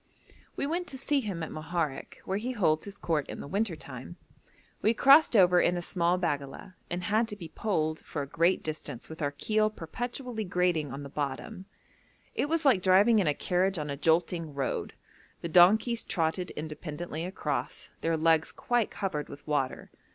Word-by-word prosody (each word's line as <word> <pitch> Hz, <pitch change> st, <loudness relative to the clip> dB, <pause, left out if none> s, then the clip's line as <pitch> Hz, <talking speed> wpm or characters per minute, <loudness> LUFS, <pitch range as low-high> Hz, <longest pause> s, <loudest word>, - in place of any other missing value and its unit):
We -, -, -1 dB
went 345 Hz, +4 st, -2 dB
to 265 Hz, -, -6 dB
see 280 Hz, +2 st, +1 dB
him 195 Hz, -9 st, -4 dB
at 160 Hz, -, -5 dB
Moharek, 155 Hz, -2 st, -3 dB
where 190 Hz, +2 st, -1 dB
he 250 Hz, +4 st, -3 dB
holds 160 Hz, -8 st, +1 dB
his 200 Hz, -1 st, -8 dB
court 155 Hz, -4 st, -1 dB
in -, -, -6 dB
the -, -, -7 dB
winter 200 Hz, +1 st, -1 dB
time. 140 Hz, +2 st, -9 dB, 0.6 s
We 225 Hz, +2 st, +3 dB
crossed 275 Hz, +2 st, +6 dB
over 180 Hz, -3 st, +6 dB
in 175 Hz, -, +2 dB
a -, -, -2 dB
small 175 Hz, 0 st, +1 dB
baggala, 145 Hz, +1 st, -3 dB, 0.2 s
and 175 Hz, +1 st, -3 dB
had 215 Hz, +6 st, +2 dB
to 210 Hz, -, -5 dB
be 170 Hz, -5 st, -9 dB
poled 160 Hz, -6 st, -1 dB
for 145 Hz, -, -4 dB
a -, -, -7 dB
great 165 Hz, +5 st, +2 dB
distance 150 Hz, -5 st, -5 dB
with 160 Hz, +1 st, -9 dB
our 145 Hz, -, +1 dB
keel 215 Hz, +9 st, +1 dB
perpetually 240 Hz, -, -5 dB
grating 180 Hz, -6 st, 0 dB
on 140 Hz, +2 st, -6 dB
the 140 Hz, -, -8 dB
bottom. 145 Hz, +6 st, -4 dB, 0.7 s
It 290 Hz, -, -1 dB
was 330 Hz, -1 st, 0 dB
like 245 Hz, -9 st, +5 dB
driving 200 Hz, +5 st, +5 dB
in 185 Hz, -, +1 dB
a 145 Hz, -, +2 dB
carriage 185 Hz, +1 st, 0 dB
on 150 Hz, -2 st, -3 dB
a -, -, -2 dB
jolting 165 Hz, 0 st, +1 dB
road; 135 Hz, -2 st, -2 dB, 0.5 s
the -, -, -3 dB
donkeys 210 Hz, +8 st, +5 dB
trotted 170 Hz, +1 st, -1 dB
independently 155 Hz, +1 st, -5 dB
across, 165 Hz, -6 st, -3 dB
their 165 Hz, 0 st, +1 dB
legs 160 Hz, 0 st, +3 dB
quite 240 Hz, -3 st, 0 dB
covered 170 Hz, -7 st, -3 dB
with 140 Hz, -, -11 dB
water. 145 Hz, -4 st, -2 dB
175 Hz, 185 wpm, -29 LUFS, 155-210 Hz, 0.7 s, crossed